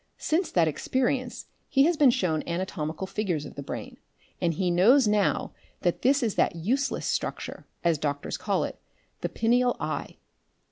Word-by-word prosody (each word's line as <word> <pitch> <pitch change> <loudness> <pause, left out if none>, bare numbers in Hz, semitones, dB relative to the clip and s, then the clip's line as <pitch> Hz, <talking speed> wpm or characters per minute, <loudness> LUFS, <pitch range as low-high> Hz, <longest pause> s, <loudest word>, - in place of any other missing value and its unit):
Since 335 +3 0
that 170 -3 +4
experience 255 - -1 0.2
he 270 -1 +4
has 335 +3 +3
been 290 -3 +6
shown 180 -11 +1
anatomical 170 -1 -3
figures 185 -7 -2
of - - -9
the 140 - -6
brain, 135 - -6 0.4
and 170 - +2
he 180 +1 +1
knows 225 +9 +5
now 210 -1 +1 0.3
that 175 - 0
this 270 +1 +3
is 220 -4 +1
that - - +1
useless 255 +12 -1
structure, - - -3 0.2
as 170 -3 +2
doctors 145 -1 -2
call - - 0
it, - - -5 0.4
the - - -2
pineal 245 +2 +2
eye. - - -4
200 Hz, 160 wpm, -27 LUFS, 170-255 Hz, 0.4 s, been